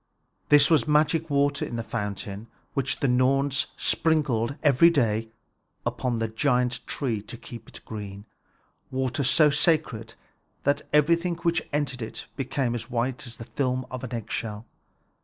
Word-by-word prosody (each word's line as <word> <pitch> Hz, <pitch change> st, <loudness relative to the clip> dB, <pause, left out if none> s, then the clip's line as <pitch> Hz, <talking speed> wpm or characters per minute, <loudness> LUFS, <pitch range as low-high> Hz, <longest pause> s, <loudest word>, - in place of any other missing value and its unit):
This 145 Hz, 0 st, +6 dB
was 150 Hz, -8 st, +4 dB
magic 155 Hz, +2 st, +2 dB
water 140 Hz, 0 st, +2 dB
in -, -, -4 dB
the 115 Hz, -, -2 dB
fountain, 105 Hz, 0 st, -5 dB, 0.3 s
which 135 Hz, -1 st, -1 dB
the 140 Hz, -, +3 dB
Norns 135 Hz, +2 st, +2 dB
sprinkled 140 Hz, -6 st, +1 dB
every 150 Hz, +3 st, +6 dB
day 115 Hz, -8 st, +1 dB, 0.6 s
upon 125 Hz, -2 st, -1 dB
the 115 Hz, 0 st, 0 dB
giant 125 Hz, +1 st, +1 dB
tree 120 Hz, -7 st, -2 dB
to 110 Hz, +3 st, -9 dB
keep 115 Hz, 0 st, -10 dB
it -, -, -10 dB
green, 100 Hz, -2 st, -7 dB, 0.6 s
water 130 Hz, +2 st, -1 dB
so 150 Hz, +3 st, +5 dB
sacred 140 Hz, -7 st, +1 dB, 0.5 s
that 140 Hz, +1 st, +2 dB
everything 170 Hz, +4 st, +3 dB
which 170 Hz, 0 st, 0 dB
entered 140 Hz, -4 st, -1 dB
it 110 Hz, -, -6 dB
became 130 Hz, -2 st, -1 dB, 0.2 s
white 125 Hz, +1 st, -2 dB
as 120 Hz, -, -6 dB
the 115 Hz, -, -8 dB
film 130 Hz, +2 st, -1 dB
of 130 Hz, -1 st, -5 dB
an 130 Hz, -, -5 dB
eggshell. 115 Hz, -1 st, -4 dB
130 Hz, 145 wpm, -26 LUFS, 115-145 Hz, 0.6 s, This